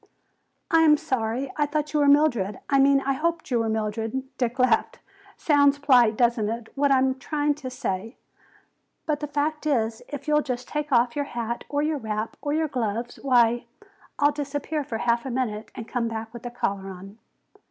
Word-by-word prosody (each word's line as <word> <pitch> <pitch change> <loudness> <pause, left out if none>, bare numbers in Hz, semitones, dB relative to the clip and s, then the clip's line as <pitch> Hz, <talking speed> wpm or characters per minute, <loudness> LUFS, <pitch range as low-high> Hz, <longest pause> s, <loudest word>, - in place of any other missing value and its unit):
"I 330 -1 +5
am 305 -2 +6
sorry. 255 0 -2
I 295 -1 +2
thought 300 0 -2
you 300 - +2
were 290 - +4
Mildred. 250 -10 +3
I 275 - +4
mean, 275 0 +5
I 275 0 0
hoped 330 +1 -2
you 240 - +2
were 225 -1 0
Mildred." 220 +3 -2 0.2
Dick 245 0 -1
laughed. 255 0 +2 0.4
"Sounds 285 -2 +4
polite, 250 -6 +4
doesn't 235 -3 +2
it, 230 0 -5
what 285 0 +1
I 270 - +6
am 260 0 +1
trying 295 +1 0
to 260 - -4
say? 225 -2 -4 0.9
But 300 -2 0
the 295 - -4
fact 300 +2 -2
is, 225 -6 0
if 285 -1 -7
you'll 300 0 +3
just 250 -3 -4
take 300 -1 -3
off 240 -1 +3
your 290 -1 -1
hat 235 -3 -4
or 290 0 0
your 305 -1 0
wrap, 215 -1 -3
or 290 - -2
your 315 +1 +1
gloves, 240 -3 -3
why, 240 -3 +3 0.5
I'll 290 +1 +4
disappear 290 +1 -3
for 230 -4 -4
half 235 +1 +1
a 265 - -5
minute 235 -4 -2
and 230 -3 -7
come 240 -2 -1
back 225 0 -5
with 240 0 -7
a - - -4
collar 200 -5 -3
on." 195 +3 -11
260 Hz, 195 wpm, -25 LUFS, 230-290 Hz, 0.9 s, am